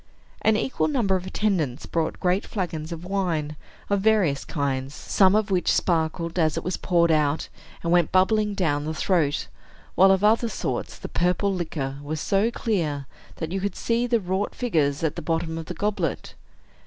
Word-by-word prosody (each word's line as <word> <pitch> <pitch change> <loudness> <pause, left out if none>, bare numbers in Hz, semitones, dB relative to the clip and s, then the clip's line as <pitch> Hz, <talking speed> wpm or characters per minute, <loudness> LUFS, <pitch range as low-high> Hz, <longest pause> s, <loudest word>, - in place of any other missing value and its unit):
An 220 -1 +3
equal 260 - 0
number 235 -10 +1
of 185 0 -3
attendants 170 -12 -1
brought 165 -1 -2
great 185 +3 +1
flagons 170 -5 -4
of 170 +1 -6
wine, 170 -6 -1 0.3
of 200 -1 +1
various 195 -10 +2
kinds, 140 -2 -2
some 190 0 +3
of 215 -1 +1
which 180 -2 +2
sparkled 165 0 0
as 155 -2 +2
it - - -2
was 180 - -1
poured 170 -2 +2
out, 150 -1 +1 0.3
and 170 - 0
went 175 -3 +3
bubbling 210 +2 +3
down 150 -6 0
the 160 +1 -3
throat; 155 -5 +1 0.5
while, 190 +1 +6
of 190 +1 +3
other 225 +2 +4
sorts, - - -3
the - - -7
purple 180 +3 +1
liquor 150 -6 -3
was 150 +2 -4
so 200 +7 +2
clear 165 - -1 0.3
that 160 -1 -5
you 190 +1 -2
could 200 -1 -2
see 235 +1 0
the 235 -1 +2
wrought 190 +1 -2
figures 155 - 0
at 160 - 0
the - - -5
bottom 165 +1 -1
of 165 - -6
the 180 - -5
goblet. 210 +4 -2
180 Hz, 180 wpm, -25 LUFS, 155-200 Hz, 0.5 s, while